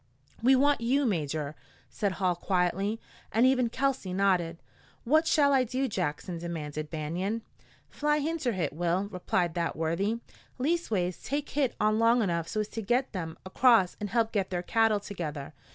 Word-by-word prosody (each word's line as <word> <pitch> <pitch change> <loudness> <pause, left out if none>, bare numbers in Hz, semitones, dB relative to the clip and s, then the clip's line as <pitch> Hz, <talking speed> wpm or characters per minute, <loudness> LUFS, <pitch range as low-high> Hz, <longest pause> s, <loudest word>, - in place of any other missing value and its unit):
"We 260 +3 +6
want 285 0 +3
you, 270 +5 +2
Major," 155 - -1 0.3
said 200 -2 -2
Hall 185 -2 0
quietly, 190 +4 0 0.3
and 230 +3 +4
even 255 -2 +3
Kelsey 265 -7 -1
nodded. 180 -4 +1 0.5
"What 310 +6 +3
shall 285 -3 +4
I 265 -1 +4
do, 255 +3 -1
Jackson?" 175 -3 -3
demanded 155 -3 -5
Banion. 175 +8 -3 0.4
"Fly 295 0 0
inter 300 -4 -1
hit, 170 -7 -2
Will," 175 +3 0
replied 180 -2 0
that 170 -1 -1
worthy. 190 +8 -1 0.4
"Leastways, 250 - -1
take 290 +1 -3
hit 275 -4 0
on 215 +1 +2
long 230 +1 +4
enough 170 -4 -1
so's 215 +2 -2
to 225 - -5
git 245 +5 0
them 165 -4 -5
acrost 220 -1 +4
an' 210 - -3
help 225 +1 +1
git 195 -3 0
their 180 -1 -2
cattle 225 0 +2
together. 155 -8 -6
200 Hz, 160 wpm, -29 LUFS, 175-250 Hz, 0.5 s, We